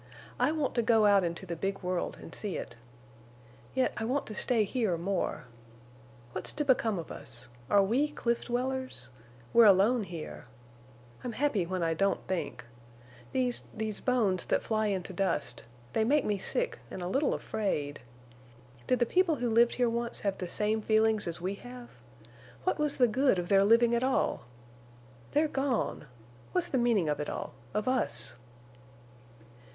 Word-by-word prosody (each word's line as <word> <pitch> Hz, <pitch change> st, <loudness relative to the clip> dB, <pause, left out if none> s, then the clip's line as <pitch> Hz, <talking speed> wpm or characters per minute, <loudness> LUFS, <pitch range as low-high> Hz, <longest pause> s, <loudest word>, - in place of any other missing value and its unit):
I 250 Hz, +4 st, +3 dB
want 305 Hz, -4 st, -1 dB
to 240 Hz, -, +2 dB
go 225 Hz, -2 st, +4 dB
out 200 Hz, -2 st, +5 dB
into 170 Hz, +2 st, -3 dB
the 170 Hz, -2 st, -4 dB
big 195 Hz, +3 st, -3 dB
world 180 Hz, -1 st, -2 dB
and -, -, -11 dB
see 205 Hz, -4 st, -2 dB
it. -, -, -7 dB, 1.0 s
Yet 260 Hz, -, +2 dB
I 220 Hz, -, -2 dB
want 260 Hz, +5 st, 0 dB
to 215 Hz, -, -7 dB
stay 230 Hz, +1 st, +2 dB
here 210 Hz, -4 st, 0 dB
more. 185 Hz, +2 st, -2 dB, 0.9 s
What's -, -, -1 dB
to 295 Hz, -, -1 dB
become 235 Hz, -6 st, +2 dB
of 165 Hz, -, -6 dB
us? 125 Hz, -3 st, -10 dB, 0.2 s
Are 200 Hz, -1 st, +5 dB
we 245 Hz, +9 st, +2 dB
cliff 235 Hz, -5 st, -1 dB
dwellers? 255 Hz, -, -3 dB, 0.4 s
We're 235 Hz, -1 st, +8 dB
alone 205 Hz, +4 st, +5 dB
here. 165 Hz, -8 st, -8 dB, 0.8 s
I'm 245 Hz, -, -4 dB
happy 230 Hz, -10 st, +1 dB
when 185 Hz, -1 st, -2 dB
I 165 Hz, 0 st, +1 dB
don't 195 Hz, +4 st, 0 dB
think. 185 Hz, -8 st, -3 dB, 0.7 s
These—these 230 Hz, -4 st, -2 dB
bones 215 Hz, -8 st, +1 dB
that -, -, +1 dB
fly 215 Hz, -1 st, 0 dB
into 190 Hz, -2 st, -2 dB
dust—they 120 Hz, -, -2 dB
make 280 Hz, +5 st, +3 dB
me 205 Hz, -2 st, 0 dB
sick -, -, -2 dB
and 180 Hz, -, -6 dB
a -, -, -2 dB
little 270 Hz, +10 st, +1 dB
afraid. 145 Hz, -9 st, -2 dB, 0.9 s
Did 255 Hz, -, +3 dB
the 240 Hz, -, +2 dB
people 360 Hz, +4 st, +2 dB
who 245 Hz, -3 st, -1 dB
lived 235 Hz, +1 st, +4 dB
here 245 Hz, -1 st, +2 dB
once 235 Hz, 0 st, -2 dB
have 200 Hz, -2 st, -1 dB
the 180 Hz, -, -4 dB
same 215 Hz, +3 st, 0 dB
feelings 220 Hz, -1 st, +2 dB
as 170 Hz, 0 st, -2 dB
we 185 Hz, +3 st, -2 dB
have? 245 Hz, 0 st, -10 dB, 0.7 s
What -, -, 0 dB
was 300 Hz, -1 st, +1 dB
the 250 Hz, -3 st, +5 dB
good 255 Hz, -1 st, +3 dB
of 175 Hz, 0 st, -3 dB
their 195 Hz, -1 st, +5 dB
living 230 Hz, +3 st, +5 dB
at 235 Hz, +1 st, +2 dB
all? 260 Hz, -, 0 dB, 0.9 s
They're 305 Hz, +2 st, +3 dB
gone! 270 Hz, -, -1 dB, 0.5 s
What's 360 Hz, -1 st, +1 dB
the 265 Hz, -, +1 dB
meaning 230 Hz, -8 st, +2 dB
of 150 Hz, -, 0 dB
it 150 Hz, -, -3 dB
all—of 125 Hz, -, -5 dB
us?" 120 Hz, -, +1 dB
220 Hz, 165 wpm, -30 LUFS, 185-250 Hz, 1.0 s, We're